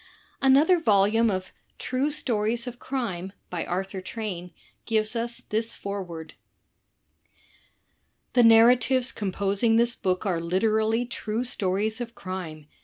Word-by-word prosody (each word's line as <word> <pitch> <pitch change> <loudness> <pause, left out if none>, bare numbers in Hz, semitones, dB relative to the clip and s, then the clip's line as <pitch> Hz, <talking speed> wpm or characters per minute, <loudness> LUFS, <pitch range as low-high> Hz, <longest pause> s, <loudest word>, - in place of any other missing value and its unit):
Another 285 +7 +5
volume 220 -3 +3
of 185 -2 -3 0.2
"True 260 +3 -1
Stories 235 -5 -1
of 245 -1 -7
Crime," 195 -9 -4 0.2
by 175 -2 -2
Arthur 190 +1 -3
Train, 185 -4 -5 0.4
gives 220 0 +1
us 235 +1 -3
this 225 +1 -1
foreword: 180 -5 -6 2.0
"The 245 - +5
narratives 240 +2 +5
composing 200 +2 0
this 235 +1 +3
book 185 -1 -2
are 175 -4 0
literally 220 +6 +1
true 235 -1 -3
stories 215 -1 -1
of 235 -1 -6
crime. 175 -5 -6
220 Hz, 115 wpm, -26 LUFS, 190-235 Hz, 2.0 s, Another